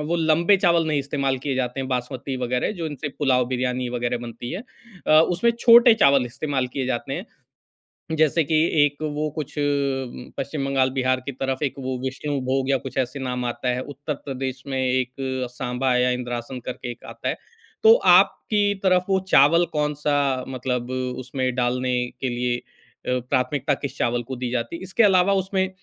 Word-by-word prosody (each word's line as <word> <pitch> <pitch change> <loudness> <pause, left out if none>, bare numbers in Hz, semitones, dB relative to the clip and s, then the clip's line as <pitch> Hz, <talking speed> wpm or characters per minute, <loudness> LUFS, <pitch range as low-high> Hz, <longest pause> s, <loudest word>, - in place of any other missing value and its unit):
वो 170 +2 0
लंबे 165 +4 +4
चावल 170 -4 +3
नहीं 155 -2 +1
इस्तेमाल 140 -1 -1
किए 135 +1 -2
जाते 130 0 -2
हैं, 130 - -4
बासमती 130 +1 -3
वगैरह 125 0 -1
जो 165 - -1
इनसे 150 0 -5
पुलाव, 130 -4 +3
बिरयानी 125 0 -1
वगैरह 120 0 -2
बनती 120 +1 -7
है 190 - -4 0.4
अ, 155 0 +7
उसमें 180 +8 +2
छोटे 235 0 +8
चावल 140 -2 +5
इस्तेमाल 135 +1 -2
किए 135 -2 -2
जाते 125 -2 -2
हैं। - - -5 0.9
जैसे 155 +1 +3
कि 155 +2 -1 0.3
एक 145 +1 -4
वो 150 +1 -1
कुछ 150 -1 -6
उम, 140 -3 -2
पश्चिम 140 -1 -3
बंगाल, 135 -1 +2
बिहार 130 0 +2
की 140 - -3
तरफ 135 0 -3
एक 140 - 0
वो 130 -1 -2
विष्णुभोग 130 0 -2
या 135 - +3
कुछ 130 +2 -8
ऐसे 130 +1 -1
नाम 125 -1 -3
आता 120 +1 -2
है, 125 - -3
उत्तर 145 +2 -5
प्रदेश 130 -1 -4
में 135 - -2
एक 130 -1 0 0.4
सांबा 125 0 -1
या 125 0 +3
इंद्रासन 125 0 -4
करके 125 -1 -5
एक 120 - -12
आता - - -4
है, - - -2 0.5
तो 445 0 +9 0.2
आपकी 205 -1 +3
तरफ 185 -1 +3
वो 190 0 +3
चावल 170 +5 +6
कौन-सा 145 -3 0
मतलब 125 -1 -3 0.3
उसमें 130 0 -2
डालने 125 0 0 0.3
के 130 - 0
लिए 120 0 -1
अ, 125 +1 -6
प्राथमिकता 140 +2 +1
किस 140 -1 -5
चावल 120 0 0
को 130 - -4
दी 125 0 -3
जाती 120 +5 -2
है? - - -8
इसके 190 +5 +1
अलावा 195 -1 +4
उसमें 190 0 -1
135 Hz, 180 wpm, -23 LUFS, 125-150 Hz, 0.9 s, तो